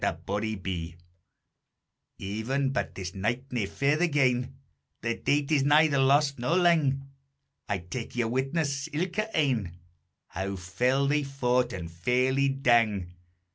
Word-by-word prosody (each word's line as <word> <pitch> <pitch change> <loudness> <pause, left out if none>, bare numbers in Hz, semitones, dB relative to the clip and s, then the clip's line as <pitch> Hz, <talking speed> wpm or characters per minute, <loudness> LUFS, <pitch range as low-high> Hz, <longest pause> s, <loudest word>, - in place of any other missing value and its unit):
_ 95 -5 -3 1.2
Even 120 +8 -2
but 130 - -3
this 90 -2 -6
night 115 +6 -1
nae 115 -5 -1
farther 150 - +1
gane, 130 -4 +1 0.5
The 115 0 -1
date 145 +1 0
is 150 -3 +4
neither 145 0 +4
lost 140 0 +3
nor 155 +9 +1
lang, 150 -6 +2 0.6
I 100 - +1
tak 95 +9 -7
ye 120 - +1
witness 135 +4 -1
ilka 185 +7 -1
ane, 115 - 0 0.5
How 95 +2 -4
fell 125 +9 0
they 150 +1 +2
fought, 125 -3 0
and 85 -4 -6
fairly 125 +9 +1
dang. 115 -9 +2
125 Hz, 125 wpm, -28 LUFS, 105-140 Hz, 1.2 s, is